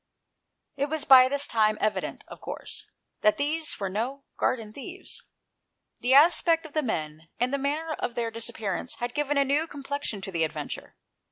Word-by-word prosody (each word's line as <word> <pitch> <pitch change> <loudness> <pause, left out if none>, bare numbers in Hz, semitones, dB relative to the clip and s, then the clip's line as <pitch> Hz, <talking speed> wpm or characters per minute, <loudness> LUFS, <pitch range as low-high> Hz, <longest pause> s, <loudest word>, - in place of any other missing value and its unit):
It 285 +1 0
was 315 -1 -1
by 255 -1 +9
this 285 +2 +2
time 215 -2 +2
evident, 215 - -1
of - - -11
course, - - -6 0.3
that 210 - +4
these 305 +2 0
were 195 - -1
no 240 +8 -3
garden 220 -4 -1
thieves. 355 - -5 0.8
The 255 +2 +3
aspect 330 +2 +5
of 310 - -11
the 310 - +2
men, 160 - -4
and 250 +2 +1
the 280 - +1
manner 305 +4 -1
of 235 - -3
their 230 -2 -1
disappearance, 225 -2 -3
had 240 0 -4
given 295 -1 0
a 280 - +4
new 290 +4 +1
complexion 285 -6 -4
to 195 - -5
the 165 -2 +1
adventure. 155 - -5
260 Hz, 175 wpm, -27 LUFS, 215-290 Hz, 0.8 s, by